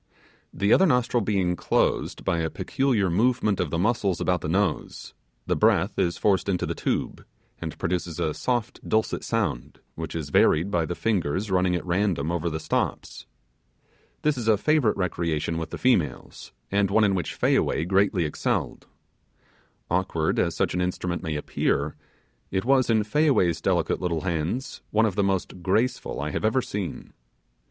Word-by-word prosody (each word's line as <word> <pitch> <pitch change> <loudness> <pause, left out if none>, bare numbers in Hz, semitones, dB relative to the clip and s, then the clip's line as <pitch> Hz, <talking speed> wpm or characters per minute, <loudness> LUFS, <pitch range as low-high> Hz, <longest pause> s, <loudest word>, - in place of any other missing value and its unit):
The 100 +2 +2
other 190 - +5
nostril 125 -3 +2
being 95 -4 0
closed - - 0
by 90 -3 +1
a 80 0 -1
peculiar 120 - 0
movement 110 +1 +2
of 90 - 0
the 85 - -2
muscles 100 -1 +1
about 90 -2 0
the - - -3
nose, 95 -2 -1 0.3
the - - 0
breath - - +2
is 85 - +1
forced 100 -1 +1
into 90 -2 0
the - - -2
tube, - - -2 0.4
and 80 -1 -6
produces 85 -1 -2
a 75 - 0
soft 120 +2 -2
dulcet 110 0 0
sound 65 +5 -2
which 80 0 -6
is 75 -4 -4
varied 85 +8 +3
by 85 -3 +1
the 85 - -3
fingers 95 -2 -1
running 90 -1 +2
at 90 - -3
random 85 -4 0
over 85 0 -1
the 80 0 -4
stops. - - -3 1.0
This 150 -4 +1
is 115 - -4
a 110 -2 +5
favourite 145 -1 +2
recreation 85 -3 -1
with 80 - -5
the - - -6
females 90 - 0 0.2
and 100 0 +2
one 110 +2 +3
in 100 -2 +3
which 90 -5 -2
Fayaway 80 - +2
greatly 95 -2 +2
excelled. 75 - -2 1.0
Awkward 85 -3 0
as - - +1
such - - 0
an 90 - 0
instrument 90 -1 -2
may 80 -2 -3
appear, 75 0 -1 0.5
it 95 +3 -2
was, 130 -1 +3
in 110 -2 +3
Fayaway's 105 - +2
delicate 85 -3 0
little 85 -3 -1
hands, 90 - -3
one 110 +1 +3
of 105 - 0
the 100 - 0
most 95 -2 -2
graceful 110 - 0
I 75 +2 -3
have - - -3
ever 110 +4 +2
seen. 100 -3 -5
95 Hz, 170 wpm, -25 LUFS, 85-110 Hz, 1.0 s, other